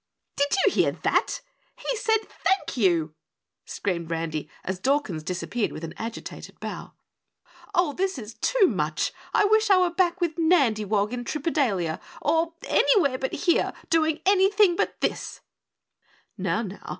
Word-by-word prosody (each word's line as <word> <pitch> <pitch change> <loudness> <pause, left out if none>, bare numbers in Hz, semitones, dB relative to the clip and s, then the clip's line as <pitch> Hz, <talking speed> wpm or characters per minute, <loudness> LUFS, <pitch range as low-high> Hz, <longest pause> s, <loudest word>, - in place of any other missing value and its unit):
"Did 285 - +2 0.2
you - - +5
hear - - +2
that? - - +1 0.4
He - - -2
said 445 0 +1
'Thank 385 -4 -1
you,'" 170 -9 +2 0.5
screamed 170 -5 -3
Randy 165 -2 -3
as 190 -1 -3
Dawkins 265 - 0
disappeared 185 +7 -2
with 155 - -8
an 165 - -5
agitated 230 +1 -7
bow. - - -7 0.8
"Oh, 350 -4 +2
this 380 -1 -1
is 220 -2 -8
too - - +3
much; - - -1 0.2
I 415 - +3
wish 435 +1 +3
I 390 - +7
were 360 -1 +3
back 355 0 +1
with 340 -2 -1
Nandywog 220 - +2
in 245 0 -3
Tripedalia 245 - -1 0.2
or 330 0 +1
anywhere 285 - +3
but 265 - -3
here, 345 - +2 0.2
doing 320 -1 +2
anything 390 -1 +4
but - - -1
this." - - -2 0.9
"Now, 195 +3 -1
now! 200 -2 -8
285 Hz, 145 wpm, -25 LUFS, -, 0.9 s, I